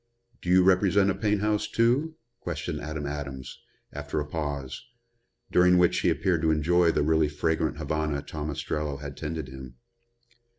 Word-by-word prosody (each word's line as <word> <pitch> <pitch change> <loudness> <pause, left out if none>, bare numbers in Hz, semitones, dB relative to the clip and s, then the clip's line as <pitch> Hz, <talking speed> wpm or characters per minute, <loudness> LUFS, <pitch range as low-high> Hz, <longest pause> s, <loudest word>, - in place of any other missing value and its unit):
"Do 90 - -5
you 90 0 +6
represent 95 +1 +4
a - - 0
paint 105 -1 0
house, 105 0 0
too?" 130 +8 +1 0.2
questioned 80 -2 -4
Adam 75 0 -5
Adams, 70 -2 -6 0.3
after 75 +1 -3
a 75 - -2
pause, 75 - -4 0.7
during 90 0 +5
which 90 -1 +3
he - - +2
appeared 90 -5 +1
to 80 - +2
enjoy 85 +3 +3
the - - +1
really 80 0 +2
fragrant 80 +1 -1
Havana 75 -1 -2
Tom 75 +1 -5
Ostrello 75 0 -3
had 70 0 -8
tended 80 -2 -5
him. 65 -2 -10
80 Hz, 160 wpm, -27 LUFS, 75-90 Hz, 0.7 s, you